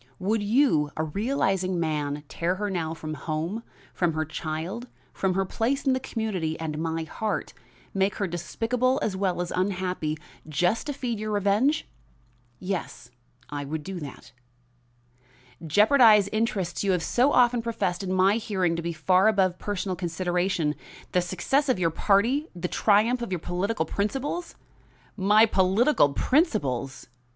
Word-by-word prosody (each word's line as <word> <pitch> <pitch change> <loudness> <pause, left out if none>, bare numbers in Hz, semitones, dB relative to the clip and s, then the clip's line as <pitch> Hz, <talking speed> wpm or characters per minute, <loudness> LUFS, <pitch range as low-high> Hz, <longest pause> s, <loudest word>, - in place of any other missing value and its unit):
Would 210 +3 0
you, 205 - +3
a 155 - 0
realizing 190 - 0
man, 150 -3 -2
tear 170 +5 -1
her 205 +1 -3
now 165 -3 -2
from 155 -1 -6
home, 160 +8 -3 0.3
from 175 -3 +1
her 155 0 -1
child, 160 - -5 0.3
from 190 -2 0
her 195 0 +1
place 250 +9 -1
in 265 - +4
the 260 - 0
community 205 -11 -3
and 155 -2 -4
my 165 0 -2
heart 215 +6 -3 0.4
make 195 +1 +1
her 205 - -1
despicable 230 +9 -1
as 200 - -1
well 190 -2 0
as 175 - -7
unhappy, 180 -4 -1 0.3
just 175 - +1
to 290 - -2
feed 245 -5 -3
your 215 0 -3
revenge?" 210 +9 +1 0.7
"Yes, 180 -10 -5 0.4
I 145 -1 -3
would 150 +2 -4
do 190 +1 -5
that." 145 -4 -9 1.4
"Jeopardize 210 - +6
interests 215 -6 -1
you 195 -1 +2
have 175 -2 0
so 255 +4 +2
often 245 -2 +4
professed 210 -6 -2
in 190 -1 -3
my 190 +3 +4
hearing 190 -6 0
to - - -2
be 170 0 -3
far 185 +5 +3
above 190 -4 +2
personal 195 -2 -2
consideration 175 -2 -1 0.4
the 180 - +2
success 190 - 0
of 255 - +3
your 170 -2 +1
party, 230 - +2
the 180 0 -3
triumph 220 +6 +3
of 235 - -4
your 180 - 0
political 180 +6 -2
principles?" 270 +11 -3 0.6
"My 210 +3 +5
political 195 - +3
principles!" 140 - 0
190 Hz, 150 wpm, -26 LUFS, 170-220 Hz, 1.4 s, Jeopardize